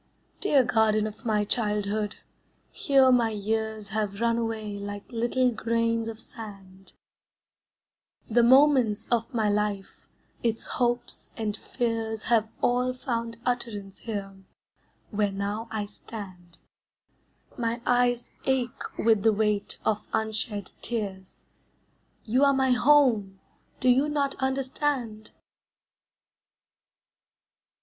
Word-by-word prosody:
Dear 290 Hz, -10 st, +4 dB
garden 220 Hz, -3 st, +2 dB
of 215 Hz, +3 st, -7 dB
my 210 Hz, -2 st, +1 dB
childhood, 210 Hz, -1 st, -1 dB, 0.6 s
here 270 Hz, -2 st, +4 dB
my 240 Hz, -2 st, +4 dB
years 220 Hz, 0 st, -2 dB
Have 210 Hz, -1 st, -2 dB
run 235 Hz, 0 st, +2 dB
away 220 Hz, -3 st, -3 dB
like 205 Hz, 0 st, -6 dB
little 245 Hz, +2 st, +1 dB
grains 230 Hz, 0 st, 0 dB
of 225 Hz, -1 st, -6 dB
sand; 195 Hz, -5 st, -11 dB, 1.3 s
The 240 Hz, +2 st, +4 dB
moments 255 Hz, -3 st, +5 dB
of 230 Hz, -1 st, +1 dB
my 225 Hz, -4 st, +1 dB
life, 205 Hz, -1 st, -2 dB, 0.3 s
its 230 Hz, -1 st, -1 dB
hopes 240 Hz, -1 st, -1 dB
and 215 Hz, -2 st, -2 dB
fears 225 Hz, -2 st, -2 dB
Have 225 Hz, -2 st, +2 dB
all 250 Hz, +1 st, +2 dB
found 230 Hz, -3 st, -3 dB
utterance 210 Hz, -6 st, -2 dB
here, 200 Hz, -4 st, -5 dB, 0.8 s
where 205 Hz, -2 st, +1 dB
now 200 Hz, +3 st, -3 dB
I 215 Hz, -2 st, -2 dB
stand; 185 Hz, -4 st, -10 dB, 1.0 s
My 235 Hz, -1 st, -1 dB
eyes 245 Hz, -1 st, +2 dB
ache 260 Hz, -3 st, 0 dB, 0.2 s
with 220 Hz, -3 st, +3 dB
the 225 Hz, -, +5 dB
weight 210 Hz, -1 st, 0 dB
of 215 Hz, -1 st, +1 dB
unshed 220 Hz, -2 st, -2 dB
tears, 195 Hz, -5 st, -5 dB, 0.8 s
You 250 Hz, +5 st, +2 dB
are 280 Hz, -1 st, +5 dB
my 265 Hz, -1 st, +2 dB
home, 245 Hz, -8 st, +4 dB, 0.4 s
do 255 Hz, -, +1 dB
you 265 Hz, +4 st, +4 dB
not 285 Hz, -2 st, 0 dB
understand? 265 Hz, -4 st, -1 dB
225 Hz, 110 wpm, -27 LUFS, 210-245 Hz, 1.3 s, moments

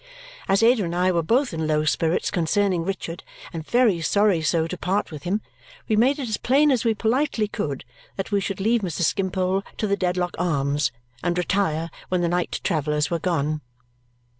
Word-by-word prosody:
As 195 Hz, +3 st, +3 dB
Ada 230 Hz, -2 st, +5 dB
and 170 Hz, -1 st, -3 dB
I 180 Hz, +1 st, +3 dB
were 170 Hz, -2 st, +1 dB
both 240 Hz, -, +1 dB
in 160 Hz, -1 st, -2 dB
low 155 Hz, 0 st, +1 dB
spirits 160 Hz, +1 st, +1 dB
concerning 180 Hz, 0 st, +1 dB
Richard 175 Hz, -2 st, -4 dB, 0.3 s
and 165 Hz, -2 st, -4 dB
very 220 Hz, -3 st, +2 dB
sorry 200 Hz, +1 st, +3 dB
so 160 Hz, 0 st, +1 dB
to 165 Hz, -, -4 dB
part 185 Hz, +3 st, -1 dB
with 150 Hz, -2 st, -7 dB
him, 200 Hz, +5 st, 0 dB, 0.5 s
we 215 Hz, -, +2 dB
made 255 Hz, +6 st, +3 dB
it 270 Hz, -4 st, -4 dB
as 220 Hz, -, -1 dB
plain 285 Hz, +4 st, +3 dB
as 250 Hz, -4 st, +1 dB
we 225 Hz, -2 st, +2 dB
politely 230 Hz, 0 st, +1 dB
could 140 Hz, -10 st, -4 dB, 0.3 s
that 195 Hz, +2 st, -4 dB
we 200 Hz, -1 st, +2 dB
should 195 Hz, -1 st, -3 dB
leave 225 Hz, +4 st, +2 dB
Mr. 175 Hz, -3 st, -2 dB
Skimpole 190 Hz, +1 st, 0 dB, 0.2 s
to -, -, -1 dB
the 200 Hz, -1 st, +1 dB
Dedlock 180 Hz, -2 st, -1 dB
Arms 145 Hz, -6 st, +1 dB, 0.3 s
and 175 Hz, 0 st, 0 dB
retire 170 Hz, -3 st, 0 dB, 0.2 s
when 180 Hz, -1 st, +1 dB
the 170 Hz, -, +1 dB
night 175 Hz, 0 st, -1 dB
travellers 150 Hz, -3 st, 0 dB
were 170 Hz, -, 0 dB
gone. 155 Hz, -3 st, -1 dB
180 Hz, 190 wpm, -24 LUFS, 165-210 Hz, 0.5 s, Ada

